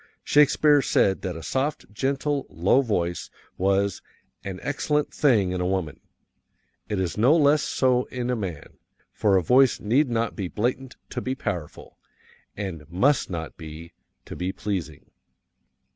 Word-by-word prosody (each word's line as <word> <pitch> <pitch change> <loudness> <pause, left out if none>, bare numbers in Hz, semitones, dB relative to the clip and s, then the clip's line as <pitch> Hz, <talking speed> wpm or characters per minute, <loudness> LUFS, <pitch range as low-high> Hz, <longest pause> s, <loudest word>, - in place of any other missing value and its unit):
Shakespeare 150 0 +4
said 95 -6 +2
that 90 -3 -4
a 80 - -8
soft, 135 -5 -2
gentle, 140 +4 -1
low 95 +11 +3
voice 90 -8 -2 0.3
was 100 +1 +1 0.4
"an 95 -2 -6
excellent 150 +1 -1
thing 110 -11 +3
in 90 -1 -2
woman;" 90 -4 -2 0.9
it 105 - -1
is 95 +2 -2
no 130 +8 +5
less 145 -1 +4
so 125 -1 +1
in 125 -1 -3
man, 90 -8 -7 0.3
for 100 -3 +3
a 90 - +1
voice 130 +6 +4
need 125 +7 +2
not 115 -1 -1
be 95 -3 -3
blatant 125 +7 -2 0.2
to 125 - -3
be 130 +2 -2
powerful, 90 - -6 0.6
and 85 -7 -6
must 130 - +2
not 80 -3 -5
be, 80 +1 -10 0.3
to - - -8
be 90 +1 -2
pleasing. 90 -8 -5
105 Hz, 145 wpm, -25 LUFS, 90-130 Hz, 0.9 s, no